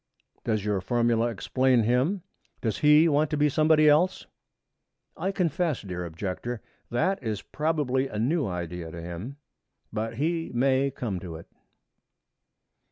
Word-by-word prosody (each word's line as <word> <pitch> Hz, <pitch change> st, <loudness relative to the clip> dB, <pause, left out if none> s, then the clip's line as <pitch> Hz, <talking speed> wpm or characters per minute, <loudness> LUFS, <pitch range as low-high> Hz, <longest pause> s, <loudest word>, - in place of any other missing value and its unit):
Does 110 Hz, -3 st, -1 dB
your 105 Hz, -3 st, 0 dB
formula 115 Hz, +3 st, +2 dB
explain 125 Hz, +2 st, +2 dB
him? 130 Hz, -, +1 dB, 0.4 s
Does 110 Hz, -3 st, -2 dB
he 150 Hz, +2 st, +6 dB
want 150 Hz, -1 st, +2 dB
to 150 Hz, -, -1 dB
be 150 Hz, 0 st, +3 dB
somebody 155 Hz, +1 st, +4 dB
else?' 155 Hz, +5 st, +3 dB, 0.9 s
'I 195 Hz, -, -1 dB
confess, 170 Hz, -, 0 dB
dear 90 Hz, -3 st, -4 dB
Objector, 95 Hz, +8 st, -4 dB, 0.3 s
that 180 Hz, +11 st, +1 dB
it 120 Hz, -, -6 dB
is 105 Hz, -2 st, -3 dB
probably 145 Hz, -4 st, 0 dB
a 105 Hz, -, -6 dB
new 140 Hz, +6 st, +1 dB
idea 90 Hz, -2 st, -4 dB
to 85 Hz, -, -8 dB
him; 90 Hz, +11 st, -7 dB, 0.6 s
but 110 Hz, +1 st, -3 dB
he 165 Hz, +5 st, -1 dB
may 135 Hz, +2 st, +3 dB
come 115 Hz, -8 st, -4 dB
to 85 Hz, -2 st, -7 dB
it.' 80 Hz, -, -10 dB
125 Hz, 145 wpm, -27 LUFS, 105-150 Hz, 0.9 s, he